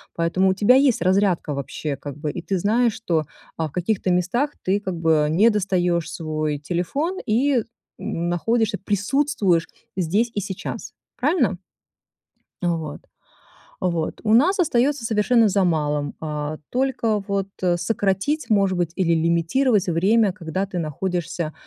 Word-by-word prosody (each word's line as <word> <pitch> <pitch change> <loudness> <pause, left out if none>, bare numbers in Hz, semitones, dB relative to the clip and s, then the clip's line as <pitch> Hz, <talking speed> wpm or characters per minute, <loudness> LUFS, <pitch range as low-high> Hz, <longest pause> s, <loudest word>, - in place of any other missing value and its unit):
поэтому 170 +3 +2
у - - +3
тебя 205 +5 +5
есть 265 -8 +3
разрядка 185 -4 +2
вообще, 140 +1 -4
как 140 0 -8
бы. 150 -1 -3
И 175 - -6
ты 190 +2 -1
знаешь, 225 +5 +2
что, 165 -7 0 0.4
э, - - +1
в 155 - -2
каких-то 185 +4 -1
местах 190 +11 +1
ты 195 +2 +1
как 190 -3 -4
бы 160 -2 +3
не 200 +9 +4
достаешь 180 -5 0
свой 155 -2 -2
телефон, 180 - -2
и 245 +2 +2 0.4
находишься, 200 +6 -1
присутствуешь 205 - +1 0.3
здесь 200 +7 +1
и - - -1
сейчас. 205 +5 -6 0.2
Правильно? 255 - +1 1.0
Э, 175 - +1
вот, 165 -3 -3 0.8
вот. 170 -3 -1
У 215 -1 +2
нас 345 - +4
остается 280 -4 +2
совершенно 225 +1 +3
за 195 0 +2
малым: 150 -4 0
э, 150 -1 -3
только 245 -4 0
вот 195 -1 -1
о 175 -2 +2
сократить 200 - -1
может 195 -3 +2
быть, 175 -2 0
или 175 -3 +2
лимитировать 170 +7 +2
время, 195 +5 +3
когда 175 +2 -3
ты 185 -3 -4
находишься 170 0 -3
185 Hz, 145 wpm, -22 LUFS, 165-225 Hz, 1.0 s, тебя